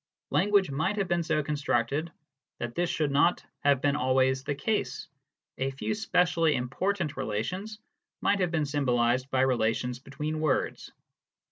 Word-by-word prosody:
Language 200 -5 +3
might 160 +9 0
have 195 -2 0
been 175 0 +1
so 155 -2 0
con 150 - -2
structed 145 +2 0 0.5
that 120 0 -4
this 175 +3 0
should 150 -3 0
not 145 +5 +3
have 140 -2 +3
been 145 0 +3
always 130 0 +2
the 145 - -2
case: 210 +10 -2 0.5
a 135 +1 0
few 135 +9 -3
specially 175 -7 +2
important 155 +7 -1
relations 185 - -3 0.4
might 200 - +2
have 180 -2 +1
been 160 -3 0
symbolised 130 -3 +1
by 130 -1 +1
relations 125 -1 +1
between 150 +4 -4
words. 155 -4 -1
145 Hz, 150 wpm, -28 LUFS, 130-175 Hz, 0.5 s, Language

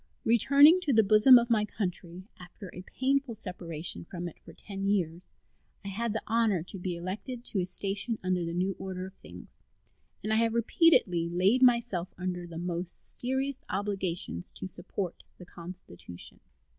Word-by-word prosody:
Returning 280 - +6
to 295 -6 +1
the 220 -1 +6
bosom 215 +5 +8
of 235 0 +1
my 215 -2 +4
country 185 -3 -5
after 180 +1 -11
a 180 - -8
painful 265 +4 -1
separation 175 -6 -6
from 175 +1 -6
it 170 - -10
for - - -12
ten 195 -1 -6
years, 180 -3 -1 0.6
I - - -3
had 225 +4 -2
the 220 - -3
honor 225 -7 +1
to 190 +2 -7
be 180 -1 -3
elected 205 +8 -5
to 205 - -2
a 180 - -1
station 205 +5 -2
under 185 -1 0
the 170 0 -4
new 185 +2 0
order 185 -1 -5
of 190 - -10
things, 90 - -13 0.7
and 215 +2 0
I - - +3
have 230 0 +2
repeatedly 230 - +3
laid 190 +8 +3
myself 235 -8 +2
under 180 -1 -4
the 165 -1 -8
most 175 +1 -5
serious 265 +2 0
obligations 190 - -2
to - - -7
support 185 -1 -5 0.2
the 180 - -11
Constitution. 170 - -10
195 Hz, 170 wpm, -29 LUFS, 180-230 Hz, 0.7 s, bosom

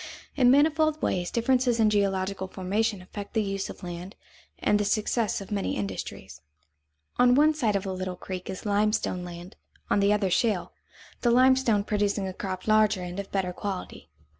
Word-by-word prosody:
In 250 -4 +5
manifold 310 +3 +3
ways 175 - -1
differences 245 0 +1
in 215 -1 +4
geological 195 -1 0
formation 195 +1 -1
affect 200 +4 -9
the 220 - +2
use 195 -1 -3
of - - -10
land 175 +3 -7 0.4
and 205 - +2
the - - +1
success 215 +1 0
of 195 - -10
many 200 -2 -1
industries. 100 -2 -6 0.8
On 245 0 +6
one 305 +3 +5
side 230 -9 0
of 200 0 -1
a 190 - -3
little 185 0 -4
creek 185 +1 -7
is 190 +2 -6
limestone 205 -3 0
land, 175 +1 -9 0.3
on - - +4
the 200 +1 +3
other 205 -3 +1
shale, 200 -1 0 0.5
the 240 - +2
limestone 255 -3 +4
producing 205 -1 0
a 190 - -5
crop 185 0 -5
larger 215 -3 +3
and 180 +2 -6
of 200 - -6
better 185 -2 -1
quality. 190 - -6
205 Hz, 175 wpm, -27 LUFS, 185-225 Hz, 0.8 s, On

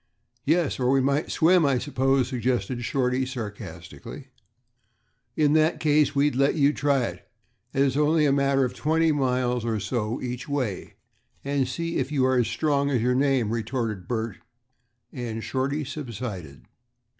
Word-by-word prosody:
"Yes, 160 -1 +1
or 125 -1 +1
we 135 +1 +4
might 140 +3 0
swim, 170 +1 +4
I 140 -3 +3
suppose," 130 +1 +1
suggested 125 -2 -2
Shorty, 125 +1 0
sarcastically. 105 -9 -8 1.1
"In 150 -1 +3
that 155 +1 +3
case, 150 -2 +2
we'd 140 -1 +2
let 140 +3 +2
you 145 -1 +3
try 140 -3 +1
it, - - -6 0.4
as 135 +1 +2
its 130 - -3
only 150 +1 +3
a 140 - +3
matter 135 -1 +2
of 125 - -4
twenty 160 +1 +1
miles 125 -4 0
or 115 -2 -1
so 115 +2 -2
each 125 +2 -5
way, 130 -10 -3 0.5
and 140 -2 0
see 165 +6 -3
if 135 +2 -2
you 135 -3 +2
are 130 -1 +3
as 120 - +1
strong 140 -2 0
as 130 -4 +1
your 125 +1 +2
name," 130 -4 +1
retorted 115 -5 -3
Bert, 110 -4 -3 0.8
and 115 -3 -5
Shorty 135 +6 -2
subsided. 105 - -7
130 Hz, 155 wpm, -25 LUFS, 120-145 Hz, 1.1 s, we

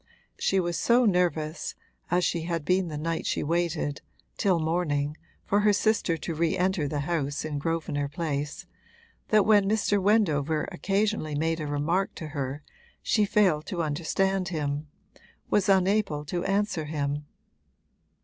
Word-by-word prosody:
She 195 - +2
was 175 -2 -1
so 245 +1 +4
nervous 170 -5 0 0.3
(as 180 0 +2
she 170 - 0
had 165 -2 -3
been 185 0 +2
the 150 -2 -5
night 165 +2 -2
she - - 0
waited, 165 -3 -1 0.3
till 190 -3 +2
morning, 155 -3 0 0.3
for 205 - +2
her 210 0 +4
sister 205 -5 +1
to 165 - -4
re 160 +1 0
enter 180 -4 +1
the 145 0 -2
house 145 -2 -2
in 150 -2 -3
Grosvenor 145 -2 -1
Place) 145 -2 -3 0.6
that 215 -2 +4
when 205 -2 +5
Mr. 205 -2 +2
Wendover 160 -8 +2
occasionally 195 -3 0
made 165 +2 0
a 155 - -3
remark 155 +7 0
to 160 -3 -6
her 140 -1 -4 0.4
she 210 -2 +3
failed 185 -7 +2
to 170 -2 -2
understand 180 +5 0
him, 150 -3 -2 0.6
was 200 -1 +2
unable 190 -5 +2
to 175 +4 -2
answer 195 -5 0
him. 145 -1 -2
165 Hz, 150 wpm, -27 LUFS, 150-195 Hz, 0.6 s, when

